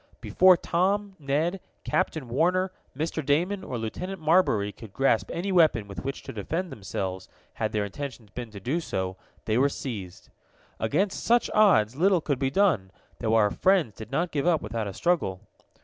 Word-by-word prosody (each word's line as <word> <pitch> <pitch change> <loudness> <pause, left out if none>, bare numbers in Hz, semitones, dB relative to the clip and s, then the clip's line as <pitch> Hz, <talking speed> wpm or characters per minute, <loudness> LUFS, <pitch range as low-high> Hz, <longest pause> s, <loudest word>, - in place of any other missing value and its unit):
Before 185 -1 +5
Tom, 195 +4 0
Ned, 155 +6 0 0.2
Captain 160 -7 -1
Warner, 180 +9 +1 0.3
Mr. 160 +1 -2
Damon 175 +8 +1
or 125 - -4
Lieutenant 180 - -5
Marbury 155 - +3
could 110 -2 -13
grasp 115 -7 +2
any 190 +4 -2
weapon 155 - +4
with 100 - -7
which 135 +1 -4
to - - -8
defend 165 - -3
themselves, 95 -2 -5 0.2
had 110 -1 -2
their 105 -1 0
intentions 115 -1 -7
been 120 +2 -6
to 105 -2 -9
do 130 - -1
so, 95 - -3 0.3
they 110 +2 +1
were 140 +2 +4
seized. 100 -10 -7 0.5
Against 175 - 0
such 240 0 +3
odds 180 - +4
little 185 +2 +4
could 145 -4 -2
be 135 -1 +1
done, 145 - +2 0.3
though 110 -1 +1
our 105 -2 +4
friends 185 - +2
did 110 - -9
not 170 +5 0
give 145 +2 -1
up 165 -4 +2
without 110 0 -3
a 100 - -5
struggle. 165 - 0
140 Hz, 175 wpm, -27 LUFS, 110-180 Hz, 0.5 s, Before